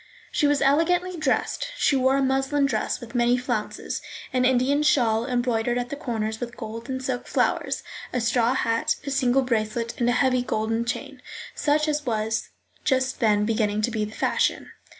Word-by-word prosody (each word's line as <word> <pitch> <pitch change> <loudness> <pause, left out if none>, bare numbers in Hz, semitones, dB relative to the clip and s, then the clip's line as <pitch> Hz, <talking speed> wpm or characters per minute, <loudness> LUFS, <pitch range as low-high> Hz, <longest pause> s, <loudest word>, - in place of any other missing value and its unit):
She 295 - +2
was 290 -1 +2
elegantly 350 +6 +2
dressed; 310 - 0
she 285 - +3
wore 265 +1 +3
a 275 - +2
muslin 270 +2 +1
dress 275 - -1
with 235 -2 -10
many 240 0 +3
flounces, 245 -4 -3 0.3
an 255 -1 +2
Indian 260 +3 +3
shawl 240 -6 +2
embroidered 240 -2 0
at 245 0 -2
the - - -4
corners 220 -6 -3
with 240 -1 -6
gold 230 +2 -7
and 260 0 -3
silk 255 -1 -3
flowers, - - 0 0.3
a 250 - -1
straw 235 +1 +2
hat, 230 -3 +1
a 280 - -3
single 265 0 +2
bracelet, 230 -1 -1
and 240 0 +2
a - - +3
heavy 255 -1 +2
gold 225 0 -1
chain, - - -4 0.3
such 305 +1 +1
as 300 -1 0
was 220 -3 -1 0.3
just 260 -1 +1
then 210 -3 +3
beginning 215 -1 0
to 240 - +1
be 220 -1 -1
the 210 - -5
fashion. - - 0
245 Hz, 180 wpm, -25 LUFS, 230-270 Hz, 0.3 s, she